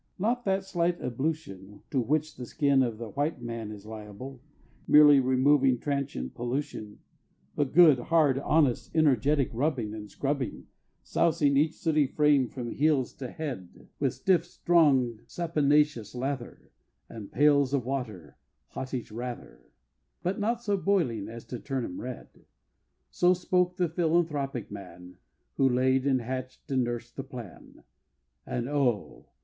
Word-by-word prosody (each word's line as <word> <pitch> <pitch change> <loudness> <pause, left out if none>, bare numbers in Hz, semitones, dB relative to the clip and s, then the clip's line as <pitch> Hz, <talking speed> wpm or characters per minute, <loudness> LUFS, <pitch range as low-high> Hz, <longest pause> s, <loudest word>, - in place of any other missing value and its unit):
not 235 +6 0
that 195 0 +1
slight 175 -2 0
ablution 120 - -4
To 135 - +1
which 155 +6 -1
the 125 -1 -8
skin 140 0 +2
of 120 -4 -1
the 115 -1 -7
White 145 +4 -2
Man 115 -3 -5
is 105 -1 -10
liable, 110 +4 -9 0.5
Merely 150 -1 +8
removing 130 0 +3
transient 140 - -3
pollution 120 -4 -4 0.6
But 145 -3 0
good, 155 -5 +7
hard, 145 -1 +2
honest, 145 -3 +1
energetic 145 -2 +3
rubbing 125 -4 -1
And 105 -1 -8
scrubbing, 140 -3 -3 0.4
Sousing 150 -4 +2
each 150 +3 +2
sooty 155 -6 +1
frame 145 -2 +3
from 120 -3 -6
heels 145 -4 +1
to 130 -2 -6
head 130 - -7
With - - 0
stiff, 185 -3 +2
strong, 145 -10 +2
saponaceous 150 - +1
lather, 130 0 -5 0.4
And 110 -3 -10
pails 145 -2 +4
of 140 -4 0
water 115 - -5 0.3
hottish 130 -4 -5
rather, 120 +2 -8 0.5
But 185 +4 -1
not 230 +3 -1
so 205 -3 +1
boiling 165 - 0
as 115 0 -9
to 125 - -6
turn 135 -2 -3
'em 90 - -7
red! 125 -1 -7 0.8
So 180 +1 +3
spoke 180 0 0
the 180 - +2
philanthropic 155 - -1
man 90 -1 -10 0.4
Who 135 -1 +4
laid, 130 +2 +2
and 130 -2 +2
hatch'd, 130 +3 -6
and 130 -2 +2
nursed 120 0 -6
the 135 - -3
plan 125 -7 -11 0.6
And 120 0 -3
oh! 135 -7 -1
135 Hz, 140 wpm, -28 LUFS, 120-155 Hz, 0.8 s, Merely